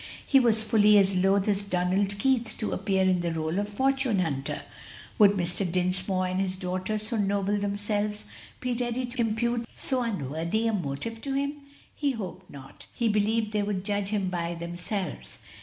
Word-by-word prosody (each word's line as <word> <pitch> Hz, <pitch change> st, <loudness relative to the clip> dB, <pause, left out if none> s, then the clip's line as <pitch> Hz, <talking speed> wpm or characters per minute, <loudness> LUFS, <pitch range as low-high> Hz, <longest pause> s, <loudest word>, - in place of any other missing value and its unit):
He 270 Hz, -, +5 dB
was 225 Hz, -3 st, +3 dB
fully 210 Hz, -1 st, +5 dB
as 195 Hz, -1 st, +4 dB
loath 195 Hz, +2 st, +3 dB
as 200 Hz, -1 st, +2 dB
Donald 195 Hz, +1 st, 0 dB
Keith 235 Hz, -1 st, +1 dB
to 215 Hz, -, -2 dB
appear 190 Hz, -2 st, +1 dB
in 185 Hz, -1 st, +3 dB
the 170 Hz, -, -1 dB
rôle 160 Hz, +2 st, -1 dB
of 205 Hz, 0 st, -2 dB
fortune 265 Hz, 0 st, +1 dB
hunter. 140 Hz, -7 st, -2 dB, 0.6 s
Would 205 Hz, -2 st, +7 dB
Mr. 180 Hz, -1 st, -1 dB
Dinsmore 185 Hz, +1 st, +1 dB
and 185 Hz, +1 st, -1 dB
his 190 Hz, -1 st, -1 dB
daughter, 185 Hz, +3 st, -2 dB
so 215 Hz, +2 st, -1 dB
noble 200 Hz, 0 st, +1 dB
themselves, 205 Hz, +1 st, -1 dB, 0.3 s
be 250 Hz, -1 st, -1 dB
ready 245 Hz, +1 st, -1 dB
to 245 Hz, 0 st, -3 dB
impute 235 Hz, +1 st, 0 dB
so 260 Hz, -1 st, 0 dB
unworthy 170 Hz, -, -1 dB
a 225 Hz, -, +1 dB
motive 200 Hz, +6 st, -3 dB
to 270 Hz, +1 st, -3 dB
him? 280 Hz, +2 st, -1 dB, 0.4 s
He 285 Hz, -2 st, 0 dB
hoped 185 Hz, -4 st, -7 dB
not, 135 Hz, -1 st, -12 dB
he 235 Hz, -2 st, +1 dB
believed 215 Hz, +1 st, +1 dB
they 210 Hz, -1 st, +1 dB
would 200 Hz, -2 st, -2 dB
judge 205 Hz, -1 st, -1 dB
him 200 Hz, -3 st, 0 dB
by 170 Hz, -1 st, -2 dB
themselves. 175 Hz, +4 st, -4 dB
205 Hz, 175 wpm, -27 LUFS, 185-225 Hz, 0.6 s, Would